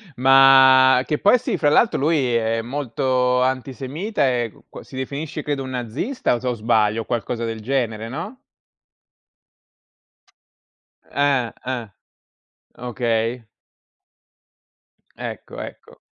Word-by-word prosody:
Ma 130 0 +6
che 150 - -1
poi 205 +9 +4
sì, - - -2
fra 145 - +2
l'altro 225 +9 +3
lui 140 -5 +1
è 115 0 0
molto 125 0 0
antisemita, 135 - -2
e 120 -3 -1 0.2
qu - - -10
si - - -14
definisce 140 +3 -5
credo 145 -2 -2
un 130 - -7
nazista 125 - -2
o 120 - -4
se 130 - -5
o 125 - +1
sbaglio, 110 -1 +1
o - - -9
qualcosa 115 0 -3
del 115 -1 -5
genere, 115 -3 -2
no? 185 - -7 2.6
Ah, 140 -4 0
ah. 120 -5 -5 0.8
Okay. 120 -1 -2 1.7
Ecco, - - -8
ecco. - - -11
130 Hz, 115 wpm, -21 LUFS, 115-140 Hz, 2.6 s, Ma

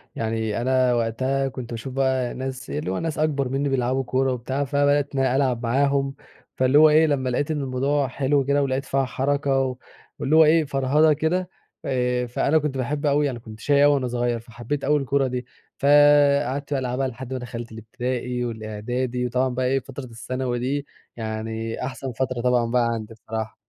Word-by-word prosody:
يعني 110 -1 -2
أنا 130 0 +2
وقتها 130 +4 0
كنت 125 -2 -7
باشوف 120 +3 -6
بقى 130 -2 0
ناس، 130 0 -6
اللي 75 +6 -3
هو 95 - -2
ناس 165 -2 -3
أكبر 145 -4 0
منّي 140 +2 -1
بيلعبوا 130 0 0
كورة 130 +1 0
وبتاع، 130 +3 -2
فبدأت 145 0 +1
إن - - 0
أنا 130 -1 +2
ألعب 130 -3 +1
معاهم. 135 +3 +1 0.4
فاللي 130 +2 +3
هو 155 0 +8
إيه 155 +1 +5
لمّا 135 -3 0
لاقيت 145 +5 -1
إن 150 -2 -1
الموضوع 135 +2 0
حلو 135 +2 +1
كده، 140 +1 +2
ولاقيت 135 0 -1
فيها 135 0 0
حركة 135 +1 0
و 130 -1 -1 0.4
واللي 150 +2 +1
هو 160 - +8
إيه 160 +1 +4
فرهدة 145 +3 +3
كده 175 +5 -1 0.4
آآ، 125 -1 0
فأنا 140 +5 +1
كنت 150 -3 -1
باحب 145 +4 -2
أوي 145 0 +2
أنا 120 -3 -5
كنت 110 -2 -12
شَقي 140 +4 +3
أوي 145 0 +6
وأنا 135 -3 0
صغيّر، 120 -1 -1
فحبيت 120 +5 -5
أوي 150 +1 +3
الكورة 140 0 +1
دي. 125 -1 -4 0.3
فقعدت 145 -1 +4
بقى 140 - +1
ألعبها 130 +1 -1
لحد 130 +1 -7
ما 130 - -3
دخلت 120 -1 -7
الإبتدائي 125 +2 -3
والإعدادي، 120 +3 -3
وطبعًا 125 +2 +1
بقى 125 +1 -2
إيه 135 +2 +2
فترة 135 +1 -9
الثانوي 125 +1 -4
دي 140 +3 -2 0.3
يعني 110 +1 -4
أحسن 130 0 -5
فترة 130 0 -2
طبعًا 120 -1 +2
بقى 125 -1 +3
عندي 115 -1 -6
بصراحة. 110 0 -6
130 Hz, 185 wpm, -23 LUFS, 120-140 Hz, 0.4 s, هو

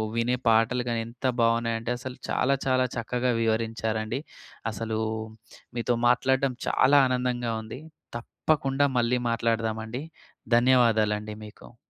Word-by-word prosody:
వినే 120 +2 +1
పాటలు 115 +3 +2
గానీ 115 -1 0
ఎంత 120 +3 -9 0.2
బావున్నాయంటే 115 0 +1
అసలు 130 0 -7
చాలా 140 +2 +2
చాలా 130 -1 +2
చక్కగా 125 +2 -1
వివరించారండి. 110 +1 -1 0.5
అసలూ 110 +1 -3 0.8
మీతో 120 +1 +1
మాట్లాడడం 130 +1 +2
చాలా 140 +2 +5
ఆనందంగా 125 -2 -1
ఉంది. 110 +4 -8 0.4
తప్పకుండా 140 +2 0
మళ్ళీ 120 +1 +1
మాట్లాడదామండి. 115 +2 -1 0.5
ధన్యవాదాలండి 110 -4 +3
మీకు. 110 +2 -14
120 Hz, 105 wpm, -26 LUFS, 115-125 Hz, 0.8 s, చాలా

